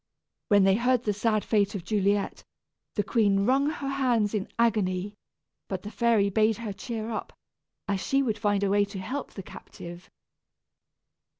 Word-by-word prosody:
When 205 -3 +5
they 195 0 +5
heard 245 0 +2
the 210 - 0
sad 215 +1 0
fate 205 -2 +1
of 190 - -4
Juliet, 200 0 0 0.5
the 205 - +1
queen 200 -4 +2
wrung 270 +4 +3
her 290 -3 -4
hands 245 -6 +1
in 205 -3 -1
agony; 205 -4 +1 0.5
but 190 -2 -4
the 210 - -7
fairy 225 -5 +2
bade 215 +1 +3
her 225 -3 -5
cheer 225 +1 -5
up, 220 - -4 0.6
as 200 -1 0
she 275 0 +1
would 220 -5 -1
find 205 -2 +1
a 195 - +1
way 205 0 +4
to 200 0 -6
help 255 +9 -5
the 195 - -7
captive. 175 0 -11
210 Hz, 170 wpm, -27 LUFS, 200-235 Hz, 0.6 s, When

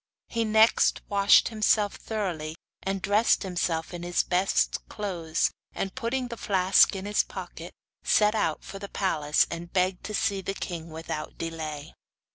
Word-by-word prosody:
He 230 -1 0
next 220 +1 +4
washed 200 0 +5
himself 215 -2 +2
thoroughly, 175 -8 -4 0.3
and 195 0 -3
dressed 205 +4 +3
himself, 175 -3 -2
in 175 - -6
his 175 0 0
best 185 +2 +1
clothes, 170 -6 -1 0.2
and 195 - -3
putting 250 0 -2
the 235 - -6
flask 190 -1 +4
in 190 0 -5
his 205 0 +2
pocket, - - -8 0.3
set 210 0 +4
out 165 -8 -1
for 195 - -8
the 200 0 -7
palace, 150 -6 +1
and 170 +1 -6
begged 185 0 0
to 215 - -3
see 195 0 0
the 195 +1 -4
king 170 -4 -5
without 160 -1 -6
delay. 155 -3 -5
190 Hz, 155 wpm, -27 LUFS, 165-210 Hz, 0.3 s, washed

